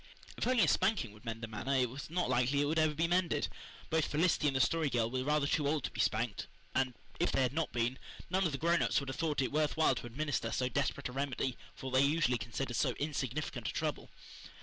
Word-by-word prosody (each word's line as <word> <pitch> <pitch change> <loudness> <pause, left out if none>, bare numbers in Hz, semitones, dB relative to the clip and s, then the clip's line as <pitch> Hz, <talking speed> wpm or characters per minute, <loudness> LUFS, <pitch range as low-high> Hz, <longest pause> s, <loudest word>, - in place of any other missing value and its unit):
If - - -2
only 255 -3 +4
a - - +4
spanking 190 - +2
would 105 +3 -16
mend 115 0 -5
the - - -2
matter 115 +5 -2
it 130 -1 +3
was 135 +5 -8
not 175 +2 0
likely 125 +3 +2
it 145 - +3
would 160 +3 +1
ever 155 -1 +2
be 165 +3 +2
mended. 175 0 +1 0.4
Both 160 -1 +3
Felicity 155 0 +2
and 135 - +1
the - - +2
Story 160 +2 +2
Girl 115 -3 0
were 130 0 -1
rather 150 +1 +2
too 145 0 +1
old 150 -2 0
to - - -3
be 115 - -9
spanked, 110 +1 0 0.3
and, 130 -2 +1 0.2
if 175 - +2
they 135 - +2
had 125 0 0
not 160 +1 -1
been, 120 +2 -1 0.3
none 190 +2 +1
of 170 - +1
the 140 - -2
grown 170 +3 +2
ups - - +2
would 140 -1 -6
have 135 - -4
thought 150 -2 0
it 130 - -2
worth 150 +1 +1
while 160 - +4
to - - -5
administer 145 +4 -2
so 125 0 0
desperate 140 +2 -1
a - - -7
remedy 135 -1 -2 0.2
for 130 - -6
what 130 - +4
they 145 +4 +3 0.2
considered 120 +2 -3
so 130 -4 +2
insignificant 145 -1 -3
a - - -5
trouble. - - -2
140 Hz, 250 wpm, -33 LUFS, 125-155 Hz, 0.4 s, only